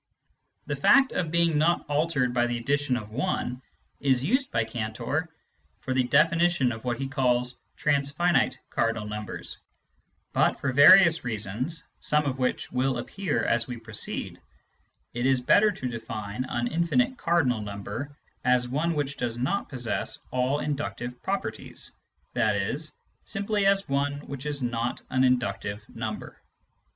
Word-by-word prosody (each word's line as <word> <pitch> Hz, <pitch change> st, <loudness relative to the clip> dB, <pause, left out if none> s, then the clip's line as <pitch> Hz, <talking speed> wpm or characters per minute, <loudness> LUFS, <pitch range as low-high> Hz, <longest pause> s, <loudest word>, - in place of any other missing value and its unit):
The -, -, -2 dB
fact 275 Hz, -1 st, +5 dB
of 170 Hz, -3 st, -1 dB
being 170 Hz, -2 st, +2 dB
not 170 Hz, +3 st, +2 dB
altered 145 Hz, -4 st, +1 dB
by 120 Hz, -1 st, +2 dB
the 120 Hz, 0 st, -1 dB
addition 140 Hz, +1 st, 0 dB
of 110 Hz, -2 st, -8 dB
1 125 Hz, -1 st, -2 dB, 0.4 s
is 130 Hz, -2 st, +2 dB
used 260 Hz, -, +1 dB
by 115 Hz, -, +1 dB
Cantor 115 Hz, +8 st, -3 dB, 0.5 s
for 130 Hz, -, -3 dB
the 130 Hz, -1 st, +2 dB
defini 165 Hz, +5 st, +4 dB
tion 135 Hz, -8 st, +1 dB
of 110 Hz, -1 st, -7 dB
what 120 Hz, -2 st, -1 dB
he 135 Hz, +1 st, -3 dB
calls 125 Hz, -2 st, +1 dB
" -, -, -44 dB
transfinite 150 Hz, +4 st, +2 dB
" -, -, -47 dB
cardinal 115 Hz, -2 st, 0 dB
numbers; 105 Hz, 0 st, -6 dB, 0.7 s
but -, -, +2 dB
for 135 Hz, -, -1 dB
various 165 Hz, +4 st, +8 dB
reasons, 120 Hz, -, -3 dB, 0.2 s
some 150 Hz, 0 st, +1 dB
of 135 Hz, -2 st, -2 dB
which 125 Hz, -, -1 dB
will 130 Hz, 0 st, +1 dB
appear 190 Hz, +11 st, -2 dB
as 120 Hz, -1 st, +1 dB
we 125 Hz, -2 st, -5 dB
proceed, 110 Hz, -1 st, -3 dB, 0.7 s
it 120 Hz, +2 st, 0 dB
is 135 Hz, -1 st, +3 dB
better 205 Hz, +12 st, +5 dB
to 130 Hz, -9 st, -5 dB
define 115 Hz, 0 st, -5 dB
an 120 Hz, 0 st, -1 dB
infinite 170 Hz, -, +1 dB
cardinal 145 Hz, -10 st, +2 dB
number 105 Hz, +8 st, -6 dB, 0.3 s
as 125 Hz, 0 st, +3 dB
one 155 Hz, +6 st, 0 dB
which 140 Hz, -1 st, -2 dB
does 120 Hz, -2 st, -2 dB
not 175 Hz, +12 st, -1 dB
possess 120 Hz, -5 st, -2 dB
all 130 Hz, +3 st, +1 dB
inductive 130 Hz, -4 st, -4 dB
properties, 195 Hz, +1 st, -4 dB, 0.4 s
i.e. -, -, +1 dB, 0.5 s
simply 200 Hz, 0 st, 0 dB
as 195 Hz, 0 st, +3 dB
one 140 Hz, +1 st, 0 dB
which 140 Hz, 0 st, -7 dB
is 145 Hz, -3 st, -3 dB
not 120 Hz, 0 st, -2 dB
an 130 Hz, 0 st, +3 dB
inductive 105 Hz, -5 st, 0 dB
number. -, -, -6 dB
130 Hz, 150 wpm, -27 LUFS, 120-155 Hz, 0.7 s, various